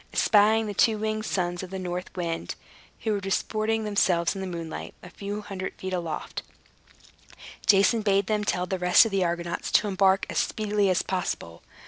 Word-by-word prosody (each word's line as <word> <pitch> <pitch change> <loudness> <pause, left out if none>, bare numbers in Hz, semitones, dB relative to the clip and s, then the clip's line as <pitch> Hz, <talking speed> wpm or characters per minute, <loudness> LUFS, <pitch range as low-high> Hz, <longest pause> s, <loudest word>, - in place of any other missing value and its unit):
Espying 220 +1 +4
the 210 - -4
two 220 +3 +3
winged 215 0 -2
sons 175 -2 -1
of 185 - -7
the 190 - -5
North 180 0 -5
Wind 170 -2 -3 0.5
(who 220 - -1
were 205 -1 -1
disporting 215 +3 -1
themselves 190 -5 +2
in 195 - -6
the 190 - -4
moonlight, 170 -3 -6
a 180 - -11
few 205 +3 -5
hundred 190 -2 -6
feet 185 0 -5
aloft), 170 -4 -4 1.3
Jason 200 +3 +5
bade 200 -1 +2
them 210 +1 0
tell 180 -3 0
the 190 0 -3
rest 180 +5 +6
of 225 - -2
the 195 -1 +1
Argonauts 170 0 -2
to 210 - +4
embark 195 -1 +3
as - - -1
speedily 210 -2 0
as 185 - +2
possible. 175 - -3
195 Hz, 180 wpm, -26 LUFS, 180-210 Hz, 1.3 s, rest